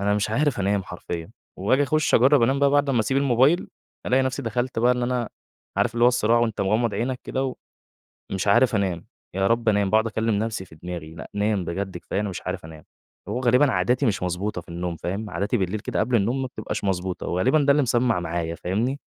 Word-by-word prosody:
أنا 100 +1 +1
مش 105 0 -1
عارف 140 0 +1
أنام 100 0 +1
حرفيًا، 85 -2 -7 0.3
وآجي 120 +10 +2
أخُش 155 +2 +1
أجرّب 130 +1 +5
أنام 135 +4 +2
بقى 140 0 +4
بعد 145 0 +2
امّا 125 -4 +2
أسيب 110 +5 0
الموبايل، 135 +4 +3 0.4
ألاقي 130 +1 +3
نفْسي 130 +1 -2
دخلت 120 +1 -2
بقى 120 +2 +4
إن 125 - -2
أنا 120 -2 -1 0.5
عارف - - +1
اللي 120 0 +3
هو - - +8
الصراع 120 -1 +2
وأنت 115 -3 0
مغمض 110 +3 +1
عينك 125 +2 -2
كده، 135 0 -2
و 130 - -3 0.8
ومش 95 0 -2
عارف 120 +4 +4
أنام، 95 -5 -1 0.3
يا 95 0 +1
رب 115 +1 +1
أنام، 100 -2 +2
باقعُد 110 +1 +3
أكلِّم 110 0 0
نفْسي 110 -3 -2
في 85 - -16
دماغي، 80 -1 -7
لأ 80 - -9
نام 105 -2 0
بجد 95 +2 -4
كفاية 100 - -3
أنا 105 - -2
مش 95 - -6
عارف 90 -1 -4
أنام، 80 -1 -11 0.4
هو 120 +5 -2
غالبًا 130 +3 +4
عاداتي 125 +2 +1
مش 100 -5 0
مضبوطة 90 +2 -2
في - - -21
النوم 85 0 -4
فاهم، 100 +6 -4
عاداتي 100 +7 -1
بالليل 95 +1 -1
كده - - -2
قبل 125 - +2
النوم 120 +6 0
ما - - -1
بتبقاش 110 -3 -5
مضبوطة، 95 -1 -2
وغالبًا 115 - +2
ده 140 - +3
اللي 145 +1 +3
مسمّع 120 -5 +1
معايا، 85 -1 -3
فاهمني؟ 115 +12 -2
110 Hz, 220 wpm, -24 LUFS, 95-125 Hz, 0.8 s, هو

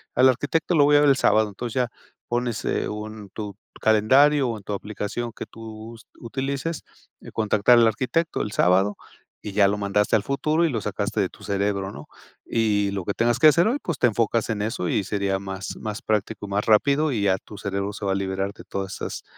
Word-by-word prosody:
al 130 +1 +6
arquitecto 145 +7 +1
lo 150 - +6
voy 145 0 +5
a - - +5
ver 145 - +5
el 135 - +5
sábado", 110 -4 +3
entonces 110 +3 -6
ya 125 -2 +1 0.4
pones, 120 -2 -2
eh, - - -1
un 105 -1 -7
tu 105 0 -7 0.2
calendario 130 +6 +4
o 115 - -3
en 105 - -13
tu 105 - -4
aplicación 105 +3 -4
que - - -7
tú 110 0 -10
us 115 - -15
utilices, 135 +6 -3 0.4
eh: - - -11
"Contactar 110 +2 +3
al 115 -1 +6
arquitecto 135 +9 0
el 105 - -3
sábado", 95 +3 +2 0.5
y 105 - -4
ya 100 -1 +5
lo 100 +1 0
mandaste 105 0 +1
al 105 - +2
futuro 155 +5 0
y - - +1
lo 120 -6 -1
sacaste - - -2
de - - +1
tu - - -17
cerebro, 100 -1 -1
¿no? 75 -4 -10 0.4
Y 105 -3 +1
lo 100 -2 -3
que 100 - -1
tengas 120 +2 +1
que 155 - +7
hacer 170 +5 +5
hoy, 245 +5 +1
pues, 170 -6 -2
te 120 - +5
enfocas 115 0 0
en 110 -2 -1
eso 105 -4 -2
y 100 - +1
sería 100 0 -1
más, 95 0 -6
más 105 -1 -5
práctico 110 -1 -2
y - - -9
más 100 +1 -1
rápido, 140 +7 +3
y 110 -6 -1
ya 95 -2 +3
tu 105 - -11
cerebro 100 0 -3
se 100 - -6
va 95 - +1
a - - -1
liberar 95 0 -2
de - - -13
todas 95 0 -5
esas - - -6
110 Hz, 225 wpm, -24 LUFS, 100-125 Hz, 0.5 s, que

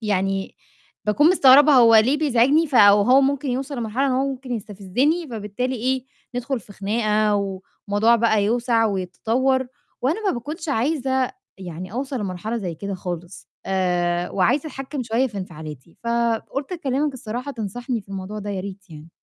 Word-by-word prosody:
يعني 195 -2 -1 0.5
باكون 290 +10 +4
مستغربة 290 -3 +7
هو 235 -4 +7
ليه 255 +7 +4
بيزعجني، 285 +2 +3
ف 280 - -8
وهو 205 +4 +6
ممكن 275 0 0
يوصل 265 +2 -3
لمرحلة 235 +4 -1
إن 270 - +1
هو 265 +2 +1
ممكن 260 -1 -6
يستفزّني، 230 - -1
فبالتالي 230 +4 -3
إيه، 260 +2 -1 0.3
ندخل 245 +1 -2
في 205 0 -15
خناقة 210 +1 +1
والموضوع 200 +3 0
بقى 220 -3 +2
يوسع 235 +1 +2
ويتطوّر، 225 +8 0 0.4
وأنا 340 - 0
ما - - +2
باكونش 300 +6 -6
عايزة 265 0 0 0.3
يعني 180 0 -8
أوصل 265 +1 -3
لمرحلة 200 +3 -4
زي 180 -5 -4
كده 200 +4 -5
خالص. 175 0 -7 0.2
آآ 180 -2 0
وعايزة 270 - +1
أتحكّم 270 0 -5
شوية 235 +3 +1
في 210 -5 -7
انفعالاتي، 160 -4 -9
فقُلت 235 +6 -1
أكلِّمك 285 -3 -1
الصراحة 245 +3 -5
تنصحني 235 +2 -4
في 195 - -22
الموضوع 195 +2 -6
ده 205 0 -5
يا 195 -2 -3
ريت 195 0 -9
يعني. 155 0 -11
230 Hz, 155 wpm, -22 LUFS, 195-265 Hz, 0.5 s, مستغربة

